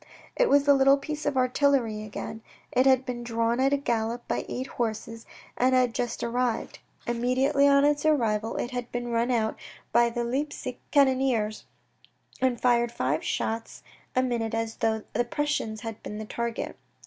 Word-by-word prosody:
It - - +3
was 285 0 +5
the 285 0 +6
little 275 0 +5
piece 300 +1 -5
of 285 -2 0
artillery 255 -4 +2
again. 215 +1 -6 0.3
It 255 +2 +3
had 260 -1 +4
been 240 -1 -4
drawn 230 0 0
at 270 +1 +3
a 285 - +3
gallop 235 -2 -2
by - - -2
eight 255 - -3
horses 230 -2 -4 0.3
and 255 +1 +3
had 250 -2 +3
just 240 0 -3
arrived. 240 0 -1 0.3
Immediately 255 +4 +2
on 280 0 +5
its 290 0 +2
arrival 230 -8 +1
it 240 - -3
had 245 -1 -5
been 240 0 -3
run 235 +1 +1
out 225 -3 0 0.3
by 235 +1 +4
the 235 0 -2
Leipsic 260 +1 -3
cannoneers 260 -6 +2 0.8
and 255 -2 +1
fired 240 -1 +2
five 140 - -1
shots 225 0 -3 0.3
a 255 - +3
minute 230 -3 -1
as 225 0 -3
though 220 -1 0
the 240 - +2
Prussians 240 -4 -2
had 225 -2 -6
been 210 - -6
the 215 - -5
target. 235 +2 -4
240 Hz, 170 wpm, -27 LUFS, 230-265 Hz, 0.8 s, the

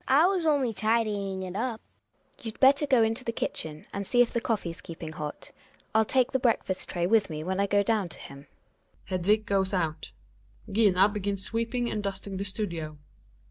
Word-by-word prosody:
I 280 +5 +6
was 365 -3 +1
only 275 -6 +2
tidying 205 -3 0
it 185 0 -6
up. 225 +1 -2 0.6
GiNA. 280 - -18
You'd 225 0 -6
better 280 +2 +5
go 255 -4 +5
into 225 +3 0
the 230 - -1
kitchen 155 -8 -4
and 200 0 -4
see 245 -1 +5
if 235 - -6
the 235 - 0
coffee's 180 -7 -2
keeping 165 -2 -7
hot; 150 -1 -6 0.4
I'll 220 0 +4
take 255 +2 +2
the 265 - +1
breakfast 225 -6 0
tray 175 -1 -1
with 215 +1 +3
me 155 -1 -4
when 190 +3 -2
I 200 - +2
go 200 0 +3
down 205 -4 +1
to - - -8
him. 140 0 -11 0.6
Hedviq 205 +4 +2
goes 195 -2 +1
out; 165 -3 -2 0.6
Gina 195 -2 +5
begins 200 -2 -3
sweeping 230 +2 -1
and 215 - -2
dusting 195 -1 -4
the 200 - -3
studio. 170 -6 -3
205 Hz, 190 wpm, -28 LUFS, 185-230 Hz, 0.6 s, I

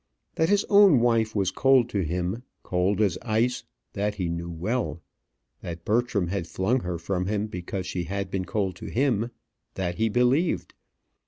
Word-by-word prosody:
That 160 - +1
his 205 0 +3
own 200 - +7
wife 115 -2 +2
was 95 -3 +1
cold 135 -3 +4
to 100 -4 -1
him, 90 +6 -2 0.2
cold 95 +3 +1
as 95 -5 +1
ice 120 +3 0 0.3
that 105 +1 -1
he 95 -4 -2
well 85 +9 -2
knew. - - -17 0.6
That 85 -1 -7
Bertram 110 -5 +1
had 90 -3 -2
flung 95 +9 0
her 90 -5 -3
from 90 +2 -2
him 105 0 0
because 90 -2 -5
she 90 -2 -3
had 100 +2 -4
been 95 -1 -2
cold 95 -3 -1
to - - -8
him 120 -3 +1 0.5
that 85 -1 -3
he 110 0 +2
believed. 125 - +1
100 Hz, 170 wpm, -26 LUFS, 90-120 Hz, 0.6 s, own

